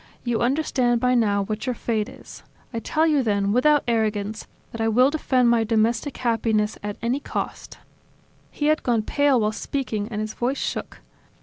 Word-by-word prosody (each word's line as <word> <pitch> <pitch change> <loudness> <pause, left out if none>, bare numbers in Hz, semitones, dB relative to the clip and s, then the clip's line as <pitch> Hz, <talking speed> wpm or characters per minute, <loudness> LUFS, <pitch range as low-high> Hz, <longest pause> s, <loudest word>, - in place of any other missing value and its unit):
You 240 -2 -1
understand 250 -2 +1
by 250 +1 +2
now 205 -4 +2
what 215 +5 -4
your 250 - 0
fate 225 -1 -2
is. - - -13 0.3
I 230 - -2
tell 310 +7 +1
you 300 -4 +3
then, 200 -4 0
without 290 +6 +4
arrogance, 215 -2 -1 0.2
that 230 - -5
I 225 - +2
will 250 +5 +4
defend 255 -5 +2
my 230 -1 +3
domestic 230 +5 0
happiness 220 -3 0
at 205 0 -5
any 245 +4 0
cost." - - -5 0.7
He 295 - -4
had 310 +1 +3
gone 235 -3 +1
pale 285 +1 +2
while 215 -1 +1
speaking 220 -3 -3
and 215 -2 -5
his 215 0 -3
voice 255 +3 -1
shook. - - -4
235 Hz, 180 wpm, -23 LUFS, 215-260 Hz, 0.7 s, without